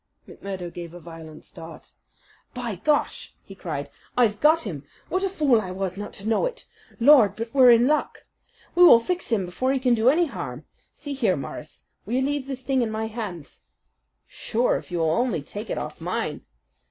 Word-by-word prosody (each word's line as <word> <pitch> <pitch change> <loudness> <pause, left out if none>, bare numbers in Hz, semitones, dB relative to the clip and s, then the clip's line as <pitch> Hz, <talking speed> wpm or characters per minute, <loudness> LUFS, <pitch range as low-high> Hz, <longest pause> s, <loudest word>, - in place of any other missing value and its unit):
McMurdo 185 -3 -7
gave 170 -1 -8
a - - -9
violent 160 -2 -11
start. 165 0 -12 0.6
"By 240 -3 -3
Gar!" 295 - +2 0.4
he - - -12
cried, - - -5 0.3
"I've 215 -4 +3
got 315 +2 +4
him. 160 - -6 0.3
What 370 +2 -1
a 390 - +1
fool 290 - +2
I 185 - -6
was 185 0 -3
not 205 +1 -6
to 200 - -7
know 225 - +2
it. - - -9 0.3
Lord! 235 -6 +6
but 230 +1 -6
we're 260 -3 +7
in 235 0 +6
luck! 300 +3 -1 0.5
We 350 - +2
will 280 -10 +9
fix 355 +4 -3
him 205 -5 +1
before 255 +9 -1
he 270 - 0
can 250 -1 +2
do 230 +1 +4
any 335 +5 +3
harm. 140 - -7 0.3
See 290 -1 -6
here, 230 -9 +1
Morris, 145 +1 -8 0.2
will 235 - -1
you 260 - +2
leave 285 -1 -2
this 265 -2 -6
thing 265 -1 +1
in 235 - 0
my 220 0 -3
hands?" 210 -9 -7 0.7
"Sure, 240 +2 0
if - - -6
you 175 - -3
will 160 -1 +1
only 235 - 0
take 205 +9 -8
it - - -2
off - - -6
mine." - - -3
230 Hz, 200 wpm, -24 LUFS, 185-270 Hz, 0.7 s, will